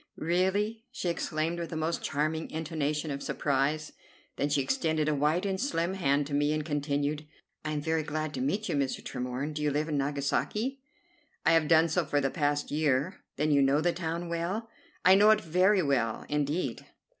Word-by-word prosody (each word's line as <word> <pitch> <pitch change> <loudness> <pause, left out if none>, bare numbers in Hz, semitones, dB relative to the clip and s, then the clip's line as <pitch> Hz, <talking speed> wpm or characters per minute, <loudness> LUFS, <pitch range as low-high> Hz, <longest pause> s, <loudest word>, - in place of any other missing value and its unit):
"Really!" 190 +7 0
she 255 -9 -2
exclaimed 165 0 -1
with 170 - -5
a - - -4
most 160 +1 -1
charming 155 +2 -1
intonation 155 -1 -2
of 140 0 -4
surprise. 145 +2 0 0.4
Then 145 - 0
she 145 - +2
extended 160 - 0
a 155 - +2
white 150 +6 +1
and 190 0 -1
slim 185 -9 0
hand 145 -6 +1
to 145 - -7
me, 145 +1 +2
and 155 -1 -2
continued, 145 0 -1 0.4
"I 155 0 -2
am 150 - -1
very 160 +1 0
glad 155 0 -3
to - - -3
meet 220 -5 -1
you, 175 - -1
Mr. 140 -2 -1
Tremorne. 125 +4 -4
Do 150 - -4
you 150 - +2
live 150 +2 -1
in 150 -2 0
Nagasaki?" 150 - -1 0.6
"I 160 - +5
have 165 -2 +4
done 160 +1 +5
so 170 +2 +1
for 145 -1 0
the 135 -1 0
past 145 -2 0
year." 150 +3 +1 0.2
"Then 150 +2 +1
you 140 -1 +5
know 135 +2 +4
the 170 +2 +1
town 170 0 -3
well?" 175 +7 -3 0.4
"I 185 - +8
know 205 +2 +6
it 215 0 +5
very 185 +3 +3
well 125 -6 0
indeed." 145 -2 -1
155 Hz, 195 wpm, -29 LUFS, 145-175 Hz, 0.6 s, I